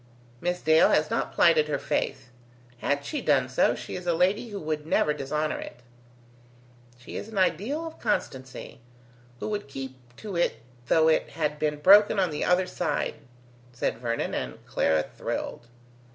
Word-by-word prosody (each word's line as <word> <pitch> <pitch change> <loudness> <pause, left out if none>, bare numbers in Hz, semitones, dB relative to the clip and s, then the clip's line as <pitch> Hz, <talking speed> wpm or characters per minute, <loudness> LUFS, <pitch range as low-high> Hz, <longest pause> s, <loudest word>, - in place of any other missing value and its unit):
Miss 180 0 -2
Dale 160 +1 +6
has 150 0 +2
not - - -1
plighted 155 -3 +4
her 145 -2 0
faith. 130 -2 -2 0.5
Had 145 +2 -1
she 295 - -3
done 140 - +3
so, 130 - +2
she - - -7
is 180 -1 -7
a 170 - +2
lady 195 +7 +1
who 205 -2 -5
would 155 -2 -3
never 150 -2 +2
dishonour 150 +2 -2
it." 125 - -9 1.2
"She 125 - -11
is - - -6
an 220 -2 -8
ideal 205 - +1
of 325 - -9
constancy, 130 - -3 0.6
who - - -4
would 205 -4 -3
keep 135 -1 -7 0.2
to 210 -4 -7
it 170 -8 0 0.3
though 160 +3 +4
it 160 - +2
had 150 -1 -2
been 150 -1 0
broken 205 +5 +7
on 185 -3 +2
the 150 - -2
other 180 +1 +3
side," 180 0 -2 0.6
said 120 -1 -2
Vernon, 115 -1 -2
and - - -5
Clara 80 -1 +1
thrilled. 120 - -5
155 Hz, 165 wpm, -27 LUFS, 140-185 Hz, 1.2 s, broken